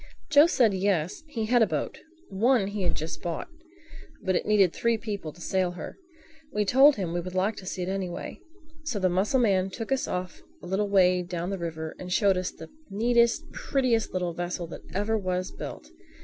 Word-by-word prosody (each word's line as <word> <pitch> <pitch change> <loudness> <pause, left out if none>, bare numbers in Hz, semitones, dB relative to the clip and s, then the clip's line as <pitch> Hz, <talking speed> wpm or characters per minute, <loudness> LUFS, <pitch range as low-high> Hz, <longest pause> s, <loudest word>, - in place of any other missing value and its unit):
Joe 295 +1 +8
said 240 - +3
yes, 185 - 0
he 230 -7 -3
had 240 +2 +3
a 220 - +5
boat—one 250 - -1
he 205 0 -4
had 180 - 0
just 160 +2 -5
bought—but 330 - -6
it - - -1
needed 200 -5 +4
three 235 -1 +1
people 205 -8 -5
to 170 - -18
sail 185 0 0
her. 170 -3 -7 0.6
We 210 0 0
told 270 +7 +6
him 180 -5 -3
we 175 - 0
would 180 +1 -7
like 195 +4 +1
to 185 - -9
see 180 - -3
it - - -4
anyway. 190 -2 -4 0.4
So 295 -8 -2
the 185 -2 +2
mussel 195 +9 +2
man 195 -5 +2
took 225 +5 -6
us 270 -1 +1
off 180 0 -4 0.2
a - - -7
little 195 +3 0
way 185 -2 +4
down 175 +1 -4
the 195 - -3
river 160 -2 -5
and 180 0 -7
showed 200 0 +4
us 185 0 -1
the - - -12 0.2
neatest, 235 +3 +2
prettiest, 255 - 0
little 180 -2 -2
vessel 175 0 -3
that - - -8
ever 205 +3 0
was 185 -1 -2
built. - - -8
195 Hz, 195 wpm, -27 LUFS, 180-230 Hz, 0.6 s, Joe